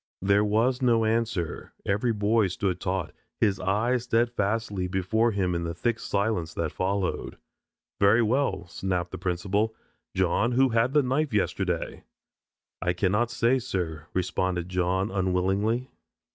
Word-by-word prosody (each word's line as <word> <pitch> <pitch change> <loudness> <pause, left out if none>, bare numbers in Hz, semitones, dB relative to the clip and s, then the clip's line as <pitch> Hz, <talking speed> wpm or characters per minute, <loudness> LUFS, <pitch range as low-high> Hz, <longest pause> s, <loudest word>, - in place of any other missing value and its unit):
There 100 +1 +4
was 115 +5 +1
no 115 -3 +3
answer. 110 -7 -1
Every 105 +4 +1
boy 105 0 +2
stood 95 -1 -2
taut, 90 -3 -2 0.3
his 100 -3 +2
eyes 110 +6 +1
steadfastly 110 -4 0
before 95 +6 +1
him 95 -4 0
in 85 0 -1
the 85 0 -4
thick 115 +5 -1
silence 100 -6 -1
that 80 -2 -1
followed. 95 0 -2 0.6
"Very 105 +4 +5
well," 115 -4 0
snapped 90 0 -3
the 95 - -6
principal. 95 +5 -1 0.4
"John, 95 +6 +2
who 130 +2 +4
had 115 +3 +2
the 150 - +5
knife 135 0 0
yesterday?" 95 -4 -1 0.8
"I 90 0 +1
cannot 105 +6 +1
say, 120 +2 +2
sir," 85 -10 -4
responded 90 -1 -1
John 95 +3 0
unwillingly. 100 +6 0
100 Hz, 135 wpm, -27 LUFS, 90-115 Hz, 0.8 s, Very